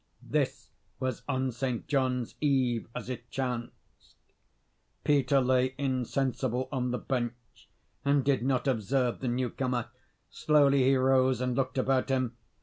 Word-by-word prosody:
This - - -1 0.3
was 130 -3 -2
on 130 -1 0
St. 125 0 -3
John's 130 -4 0
Eve, 130 -6 +1
as 125 - -5
it 120 -1 -6
chanced. 125 -3 -6 0.9
Peter 140 -1 +3
lay 130 0 +2
insensible 130 -1 -1
on 125 -3 -1
the 125 - -1
bench, 120 -3 -5 0.3
and 140 -1 +2
did 135 -4 +2
not 130 0 0
observe 125 +1 0
the 130 - -3
newcomer. 125 0 -1 0.4
Slowly 140 -3 +4
he 135 +1 +5
rose, 130 -1 +3
and 125 -1 -1
looked 130 0 -1
about 130 0 +1
him. 130 -3 0
130 Hz, 135 wpm, -29 LUFS, 125-135 Hz, 0.9 s, he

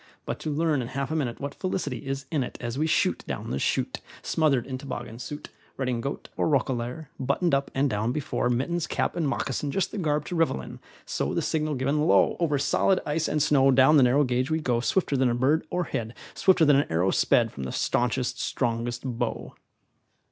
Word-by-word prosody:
But - - -4
to - - -4
learn 150 -2 +1
in 120 - -4
half 140 +3 -3
a - - -1
minute 130 -7 -2
What 140 0 -4
felicity 185 -6 -3
is 135 0 -3
in 150 -4 +1
it, - - -7
As 120 -1 -4
we 155 +3 0
shoot - - +1
down - - -4
the 65 - -1
chute, - - -1 0.2
Smothered 145 -6 +2
in 130 -1 -5
toboggan 120 -4 -6
suit, 145 +3 -7 0.3
Redingote 130 0 -3
or - - +1
roquelaure, 130 +1 -1
Buttoned 140 +6 0
up 140 0 +1
(and 135 +2 +3
down) 110 -1 -1
before, 140 -3 -1
Mittens, 155 +7 0
cap, - - -1
and 165 -4 0
moccasin, 135 +1 -2
Just 190 +5 -1
the 210 - -4
garb 150 -3 0
to 180 - -4
revel 165 - +2
in; 60 - -9 0.3
So, - - -2
the - - +1
signal 155 -1 0
given, 140 +3 0
lo! - - +4
Over 155 -4 +1
solid 185 +7 +2
ice 155 +2 0
and 150 -2 +1
snow, 135 -2 +4
Down 135 +3 +6
the - - +6
narrow 130 +3 +4
gauge 130 +1 0
we 160 0 +1
go 125 -6 0
Swifter 145 +4 +1
than 130 -1 +3
a 120 - 0
bird 140 +6 +1
o'erhead, 120 -10 -2 0.2
Swifter 185 -4 +4
than 145 -2 +6
an 140 - 0
arrow 90 +4 +2
sped - - +3
From 65 - -6
the 65 - -4
staunchest, 125 +1 0
strongest 120 -1 -2
bow. 120 -2 -3
135 Hz, 210 wpm, -26 LUFS, 125-155 Hz, 0.3 s, Down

